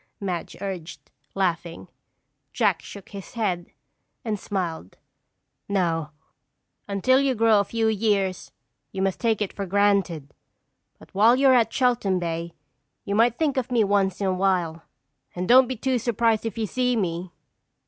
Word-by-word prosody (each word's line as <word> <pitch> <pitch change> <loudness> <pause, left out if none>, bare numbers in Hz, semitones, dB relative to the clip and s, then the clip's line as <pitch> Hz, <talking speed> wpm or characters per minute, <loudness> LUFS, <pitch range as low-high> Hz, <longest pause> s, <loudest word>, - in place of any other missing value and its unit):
Madge 185 -4 -4
urged, 185 -4 -7 0.2
laughing. 175 -3 -2 0.7
Jack - - +1
shook 200 -2 -11
his 200 -2 -10
head 185 -7 -1 0.6
and 215 -3 -2
smiled. 170 - -4 0.7
"No, 165 -6 0 0.8
until 210 +7 +3
you 275 -2 +1
grow 225 -1 +4
a - - +3
few 225 +2 -1
years 200 -4 0 0.4
you 190 -1 -2
must 195 -1 -1
take 225 -3 +1
it 200 - -6
for 200 -1 -5
granted. 195 -7 +1 0.6
But - - -18
while 220 +5 +5
you're 265 0 +5
at 230 -2 +3
Cheltham 240 -8 +1
Bay 170 -1 -3 0.5
you 200 - -2
might 230 +3 +3
think 295 -4 0
of 255 -1 -1
me 235 -3 +3
once 195 -2 +1
in 200 - -1
a 190 - +1
while. 180 -4 0 0.5
And 180 +1 -3
don't 255 +2 +7
be 260 - -3
too 255 +2 0
surprised 230 -1 +1
if 225 - -6
you 225 - 0
see 250 +3 0
me!" 175 -4 -2
200 Hz, 155 wpm, -24 LUFS, 185-230 Hz, 0.8 s, don't